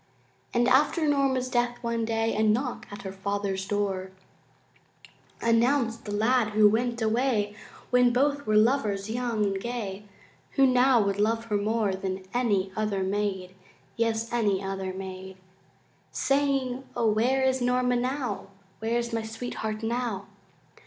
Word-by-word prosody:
And 240 Hz, 0 st, +2 dB
after 300 Hz, +5 st, +3 dB
Norma's 270 Hz, -3 st, +2 dB
death, 240 Hz, -1 st, 0 dB
one 230 Hz, -1 st, -1 dB
day 225 Hz, 0 st, 0 dB
A 215 Hz, -, +1 dB
knock 235 Hz, +4 st, 0 dB
at 205 Hz, -, -8 dB
her 190 Hz, -, -5 dB
father's 195 Hz, 0 st, -3 dB
door 195 Hz, -2 st, -1 dB, 1.3 s
Announced 230 Hz, 0 st, +2 dB
the 205 Hz, -, -5 dB
lad 220 Hz, +1 st, +2 dB
who 215 Hz, 0 st, +6 dB
went 235 Hz, +3 st, 0 dB
away 220 Hz, -2 st, +1 dB, 0.4 s
When 250 Hz, -1 st, +5 dB
both 285 Hz, +2 st, +1 dB
were 215 Hz, -, +2 dB
lovers 215 Hz, -3 st, +2 dB
young 235 Hz, -3 st, 0 dB
and 195 Hz, -1 st, -1 dB
gay, 210 Hz, -4 st, -5 dB, 0.5 s
Who 275 Hz, -, +5 dB
now 255 Hz, -2 st, +4 dB
would 200 Hz, 0 st, -1 dB
love 225 Hz, +2 st, +1 dB
her 215 Hz, -2 st, -2 dB
more 210 Hz, -1 st, 0 dB
Than 190 Hz, 0 st, -4 dB
any 205 Hz, -6 st, +1 dB
other 210 Hz, -3 st, -1 dB
maid, 190 Hz, -2 st, -2 dB, 0.4 s
Yes, 230 Hz, 0 st, -1 dB
any 205 Hz, -5 st, +1 dB
other 195 Hz, -1 st, -3 dB
maid, 190 Hz, 0 st, -8 dB, 0.7 s
Saying, 275 Hz, -2 st, 0 dB
O 235 Hz, -2 st, +1 dB
where 240 Hz, +5 st, +2 dB
is 260 Hz, -1 st, +2 dB
Norma 250 Hz, 0 st, +2 dB
now, 250 Hz, -4 st, -2 dB, 0.3 s
Where 225 Hz, +2 st, 0 dB
is 235 Hz, -1 st, -3 dB
my 225 Hz, -, 0 dB
sweetheart 220 Hz, -1 st, -5 dB
now? 230 Hz, -4 st, -2 dB
225 Hz, 145 wpm, -27 LUFS, 205-245 Hz, 1.3 s, who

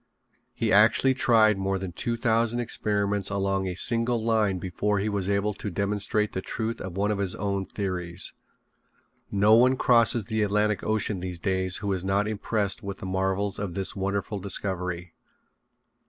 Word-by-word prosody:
He -, -, 0 dB
actually 115 Hz, +6 st, +5 dB
tried 110 Hz, -5 st, +3 dB
more 95 Hz, 0 st, -1 dB
than 95 Hz, -1 st, -5 dB
two 115 Hz, +7 st, -3 dB
thousand 115 Hz, 0 st, +1 dB
experiments 105 Hz, -4 st, -1 dB
along 95 Hz, -1 st, -1 dB
a 90 Hz, -, -3 dB
single 115 Hz, +2 st, +1 dB
line 110 Hz, -4 st, +1 dB
before 95 Hz, +3 st, -1 dB
he 100 Hz, +2 st, -1 dB
was 100 Hz, -2 st, -2 dB
able 100 Hz, +1 st, 0 dB
to 105 Hz, -, -6 dB
demonstrate 100 Hz, +2 st, -1 dB
the 95 Hz, -, -3 dB
truth 115 Hz, +3 st, -4 dB
of 95 Hz, -1 st, -6 dB
one 105 Hz, +2 st, +1 dB
of 105 Hz, -, -2 dB
his 95 Hz, -2 st, +1 dB
own 100 Hz, -1 st, -2 dB
theories. 90 Hz, -3 st, -4 dB, 1.0 s
No 105 Hz, +2 st, +4 dB
one 130 Hz, +3 st, +5 dB
crosses 115 Hz, -3 st, +4 dB
the 110 Hz, +1 st, -1 dB
Atlantic 105 Hz, 0 st, +1 dB
Ocean 110 Hz, -2 st, 0 dB
these 90 Hz, -1 st, -5 dB
days 95 Hz, 0 st, 0 dB
who 100 Hz, -, 0 dB
is 90 Hz, -2 st, -3 dB
not 100 Hz, +2 st, +1 dB
impressed 105 Hz, -1 st, -1 dB
with 100 Hz, -1 st, -6 dB
the -, -, -8 dB
marvels 95 Hz, +2 st, -1 dB
of 100 Hz, -4 st, -4 dB
this 95 Hz, -1 st, 0 dB
wonderful 100 Hz, +1 st, -2 dB
discovery. 90 Hz, -3 st, -2 dB
100 Hz, 170 wpm, -26 LUFS, 95-110 Hz, 1.0 s, actually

